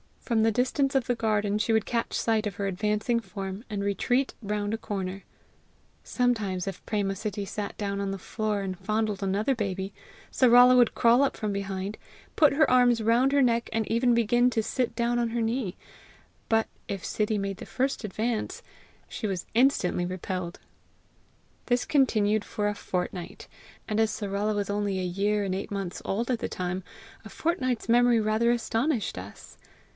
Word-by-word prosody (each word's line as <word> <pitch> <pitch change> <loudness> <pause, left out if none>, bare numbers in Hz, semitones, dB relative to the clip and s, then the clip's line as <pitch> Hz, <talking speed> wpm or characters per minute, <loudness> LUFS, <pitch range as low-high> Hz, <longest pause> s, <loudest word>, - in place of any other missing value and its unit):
From 230 -3 0
the 225 - +4
distance 270 +4 +1
of 265 -3 +2
the 245 - +2
garden 210 -3 0
she 225 +1 +1
would 220 -1 +2
catch 230 -1 -2
sight 220 -2 +1
of 200 - -5
her 200 - -3
advancing 210 +4 0
form, 195 0 -6
and 205 -2 -3
retreat 245 +6 0
round 205 0 -2
a - - 0
corner. 195 -3 -5 0.8
Sometimes 215 -8 0
if 195 - -6
Préma 200 -3 -1
Sittie 205 -1 -3
sat 200 0 -5
down 200 -1 -2
on 200 -1 -2
the 195 - -3
floor 210 +1 -2
and 185 -2 -4
fondled 215 +1 -1
another 200 +7 +1
baby, 195 -4 -3 0.4
Sarala 250 0 +7
would 245 -2 +4
crawl 235 +2 +5
up 280 - +2
from 215 -1 -2
behind, 195 0 -4 0.4
put 300 -3 +6
her 310 +1 +4
arms 245 -2 +4
round 240 +4 +3
her 285 - +4
neck, 235 -1 +1
and 220 0 0
even 235 +1 +3
begin 240 +2 +3
to 225 -2 0
sit 240 0 -1
down 240 +1 +1
on 235 -1 0
her 235 0 -1
knee; 225 -4 -1 0.7
but 225 0 +2 0.2
if 195 -2 -4
her - - -9
Sittie 215 0 0
made 195 -1 -3
the - - -8
first 265 -3 -1
advance, 220 +3 -2 0.5
she 220 - -4
was 185 -3 -3
instantly 225 -8 +2
repelled. 185 -1 -4 1.1
This 245 0 +1
continued 215 -7 +2
for 210 -1 -1
a - - -1
fortnight; 180 -2 -4 0.4
and 215 0 -1
as 220 -1 +3
Sarala 205 +1 -2
was 205 -1 -2
only 205 -1 -1
a 185 - -2
year 200 +3 0
and 190 -2 -1
eight 195 +3 -4
months 195 -3 -4
old 230 +6 -1
at 240 - 0
the - - -3
time, 180 +1 -3 0.4
a - - -8
fortnight's 255 -9 -1
memory 240 0 +5
rather 215 +2 +2
astonished 235 - 0
us. 95 +3 -10
215 Hz, 180 wpm, -27 LUFS, 195-235 Hz, 1.1 s, Sarala